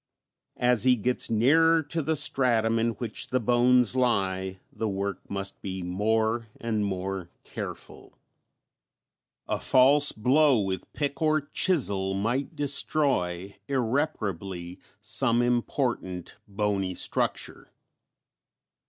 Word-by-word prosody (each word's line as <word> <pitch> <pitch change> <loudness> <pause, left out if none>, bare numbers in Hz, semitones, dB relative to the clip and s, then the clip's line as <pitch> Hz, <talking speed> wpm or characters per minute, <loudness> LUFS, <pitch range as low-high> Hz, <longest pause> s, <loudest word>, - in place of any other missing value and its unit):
As 125 -3 +2
he 130 -1 +5
gets 125 +3 -1
nearer 160 +9 +4
to 160 +3 -3
the 160 +2 0
stratum 115 -6 +2
in 115 +1 +1
which 115 -2 -5
the 130 - 0
bones 125 0 +3
lie 95 -6 0
the 110 - -2
work 100 0 -3
must 100 0 -4
be 95 -1 -5
more 110 +5 0
and 110 -2 -1
more 95 -2 -3
careful. - - -9 1.3
A - - -1
false 140 +3 +5
blow 130 +3 +3
with 95 -3 -3
pick 140 -1 -3
or 155 -1 +3
chisel 100 - 0
might 120 +8 -2
destroy 130 - 0
irreparably 100 - -2 0.2
some 120 +3 +1
important 120 - -2
bony 100 -2 -1
structure. - - -3
115 Hz, 110 wpm, -27 LUFS, 95-130 Hz, 1.3 s, he